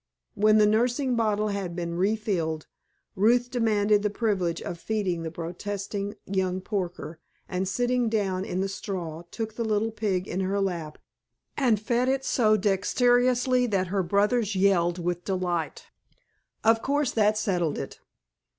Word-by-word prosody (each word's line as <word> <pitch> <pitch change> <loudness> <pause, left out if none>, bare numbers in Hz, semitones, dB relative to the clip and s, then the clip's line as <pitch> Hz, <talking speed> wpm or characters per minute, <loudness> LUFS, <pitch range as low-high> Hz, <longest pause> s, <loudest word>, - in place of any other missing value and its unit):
When 215 +1 +4
the 210 - +6
nursing 245 +5 +2
bottle 215 -2 +1
had 195 -4 -3
been 170 -1 -3
refilled 185 -5 -1 0.5
Ruth 240 +5 +3
demanded 210 -3 +2
the 210 - +1
privilege 195 -6 -1
of 170 - -6
feeding 195 -6 -1
the 165 - -3
protesting 200 +5 -5
young 185 -1 -1
porker, 180 -4 -4 0.3
and 185 +1 -2
sitting 245 +3 +1
down 195 -4 0
in 185 -1 -2
the 195 - 0
straw 180 -5 -5
took 220 +1 -5
the 230 - -3
little 220 0 0
pig 200 -4 -1
in 180 - -3
her 195 +1 0
lap 170 -6 -3 0.6
and 240 -7 +2
fed 240 +4 +1
it 270 0 0
so 215 -3 +3
dexterously 245 +5 +2
that 190 -4 0
her 195 - +2
brothers 205 +4 +1
yelled 185 -3 +3
with 175 0 -2
delight. 180 -4 -2 0.8
Of 225 0 +4
course 285 -1 0
that 215 -1 +2
settled 180 -8 0
it. - - -6
205 Hz, 150 wpm, -26 LUFS, 185-225 Hz, 0.8 s, the